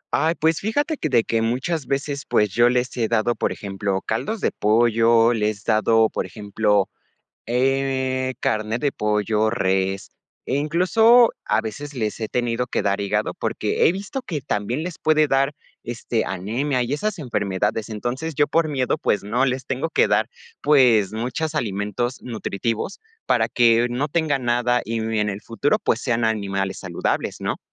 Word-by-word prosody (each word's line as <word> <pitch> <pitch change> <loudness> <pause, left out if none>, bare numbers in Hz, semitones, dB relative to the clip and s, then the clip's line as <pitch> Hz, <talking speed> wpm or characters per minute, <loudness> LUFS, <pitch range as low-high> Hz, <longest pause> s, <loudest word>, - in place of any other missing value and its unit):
Ay, 160 +3 +2
pues, 160 0 +1
fíjate 290 +9 -1
que 155 - -2
de 120 -4 +3
que 115 0 0
muchas 130 +6 -1
veces, 140 +1 -2
pues, 105 -2 +2
yo 120 +4 +4
les 125 +1 0
he 115 -2 +1
dado, 115 +1 +1
por - - -1
ejemplo, 100 -1 -3
caldos 210 - -2
de - - +1
pollo, 115 +1 +3
les 105 -2 -1
dado, 110 0 +3
por - - -4
ejemplo, 105 -1 0 0.6
eh, 130 0 0
carne 110 +1 -1
de 140 +1 0
pollo, 105 +1 0
res 95 -3 -1 0.3
e 130 - -1
incluso, 220 +11 +4
a 105 +1 +2
veces, 145 +7 -6
les 110 -4 -2
he 110 - -2
tenido 120 +1 -1 0.2
dar 100 0 0
hígado, 100 - -1
porque - - 0
he - - +4
visto 200 +8 -5
que 155 - -4
también 115 +6 -2
les 175 -2 -6
puede 155 -1 +3
dar, 135 +1 +2 0.3
este, 120 -1 -2
anemia 115 +9 -1
y 120 +3 -2
esas 205 +7 -2
enfermedades. 110 -4 -1
Entonces, 120 +9 -4
yo, 145 - +4
por 165 -1 +2
miedo, 130 -4 0
pues, 105 - 0
no, 120 +6 +1
les 130 0 -2
tengo 135 +5 -2
que - - +3
dar, - - +2 0.3
pues, 125 -9 +4
muchos 130 +8 -3
alimentos 105 +2 -2
nutritivos 115 - -3 0.3
para - - +3
que 115 0 +4
no 130 +5 -1
tengan 145 -5 0
nada 120 0 +2
y, 115 +2 -2
n 110 0 -1
en 105 - 0
el 100 +1 -5
futuro, 145 - 0
pues, - - +1
sean 120 -3 0
animales 100 -3 -1
saludables, - - -2
¿no? - - -2
120 Hz, 170 wpm, -22 LUFS, 110-140 Hz, 0.6 s, yo